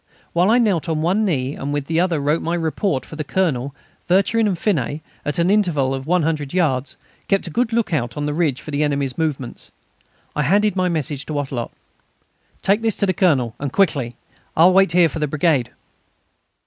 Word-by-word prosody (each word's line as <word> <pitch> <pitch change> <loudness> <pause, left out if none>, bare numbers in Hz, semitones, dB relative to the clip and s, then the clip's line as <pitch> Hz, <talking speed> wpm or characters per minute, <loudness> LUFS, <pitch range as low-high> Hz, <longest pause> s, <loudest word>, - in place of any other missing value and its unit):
Whilst 175 +3 +3
I 235 - +5
knelt 190 -8 +1
on 155 -1 -1
one 190 +6 +2
knee 140 -9 0
and 145 0 -4
on - - +1
the 160 +3 -1
other 175 -3 +1
wrote 150 +3 +1
my 170 +1 -1
report 165 - -1
for - - -10
the 155 - -3
Colonel, 140 -5 -1 0.3
Vercherin 200 +5 +3
and 190 -4 -1
Finet, 155 - -1 0.2
at 145 - -2
an 170 +2 +2
interval 165 -11 +2
of 135 +1 -5
100 160 -5 0
yards, 135 -7 0 0.3
kept 195 -1 +1
a 170 - -5
good 240 +7 0
look 230 -5 0
out 125 -3 -1
on 145 - -2
the 150 - -1
ridge 150 -5 0
for 155 - -8
the 145 +1 -1
enemy's 140 -3 0
movements. 145 -6 -3 0.7
I 150 - +1
handed 200 +7 +2
my 185 -1 +1
message 150 -3 -2
to 155 - -4
Wattrelot: 135 -5 -3 0.9
"Take 200 +3 +2
this 225 -2 +1
to - - +1
the 185 - +1
Colonel, 140 - +2
and 140 -2 -3
quickly. 140 -11 +1 0.4
I 165 - +7
will 185 - +6
wait 195 -2 +4
here 175 -1 +5
for 160 - -5
the 150 - 0
brigade." 145 -4 +1
160 Hz, 205 wpm, -20 LUFS, 140-185 Hz, 0.9 s, I